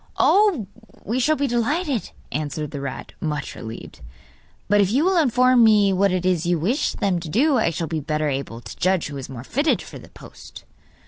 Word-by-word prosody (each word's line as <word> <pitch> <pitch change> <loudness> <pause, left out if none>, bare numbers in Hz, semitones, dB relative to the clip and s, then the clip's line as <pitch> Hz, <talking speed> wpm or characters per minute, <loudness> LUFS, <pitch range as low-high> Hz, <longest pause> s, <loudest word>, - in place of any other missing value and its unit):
'Oh, 395 - +3 0.4
we 235 +5 -1
shall 305 +5 +2
be 285 - -1
delighted,' 260 - -1 0.2
answered 150 0 -3
the 140 -2 -5
rat, 140 -1 -6
much 150 -2 -3
relieved. 115 +1 -9 0.7
'But 205 0 +4
if 195 - +2
you 270 +9 +2
will 380 0 +2
inform 255 -4 +4
me 210 -3 +5
what 195 +1 +2
it 185 -1 -1
is 175 -2 +1
you 175 0 +2
wish 225 - 0
them 195 -5 0
to 165 -2 -7
do 265 - +3
I 220 - +2
shall 165 0 -3
be 160 0 -3
better 150 +1 -2
able 135 -4 -4
to 100 - -10
judge 185 -4 +1
who 145 - -7
is 135 - -7
most 130 -1 -10
fitted 285 +5 +2
for - - -10
the - - -15
post. - - -13
190 Hz, 205 wpm, -22 LUFS, 150-255 Hz, 0.7 s, me